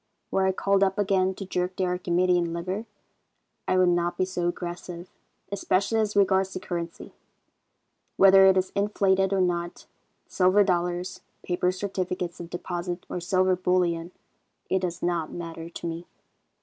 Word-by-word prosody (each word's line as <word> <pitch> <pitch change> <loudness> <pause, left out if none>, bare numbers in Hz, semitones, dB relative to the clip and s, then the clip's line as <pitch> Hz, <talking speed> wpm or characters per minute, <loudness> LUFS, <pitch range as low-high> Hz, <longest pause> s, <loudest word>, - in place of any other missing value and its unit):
Were 190 0 +2
I - - +3
called 195 +1 +2
up 195 0 +1
again 190 -2 +1
to 195 - -6
jerk 180 0 -2
the 185 - 0
Archimedean 180 -1 +1
lever, 185 +6 -4 0.8
I 185 - +2
would 185 -1 +5
not 175 0 0
be 185 - +2
so 180 -2 -2
aggressive, 175 0 -5 0.4
especially 200 +2 +1
as 210 -1 0
regards 190 -1 +3
the - - -4
currency. 170 -2 -6 1.0
Whether 195 0 +8
it 190 0 +5
is 185 0 0
inflated 195 -1 +2
or 195 -1 +2
not, 175 -1 -2 0.4
silver 185 +2 +4
dollars, 180 -1 -1 0.2
paper 180 0 0
certificates 185 -2 -3
of 170 -1 -7
deposit 175 0 -4
or - - -3
silver 185 +1 +2
bullion, 180 -2 0 0.6
it 190 - +3
does 175 -2 -4
not 170 -2 -1
matter 165 -1 -7
to 170 - -8
me. 165 +1 -6
185 Hz, 150 wpm, -26 LUFS, 175-190 Hz, 1.0 s, Whether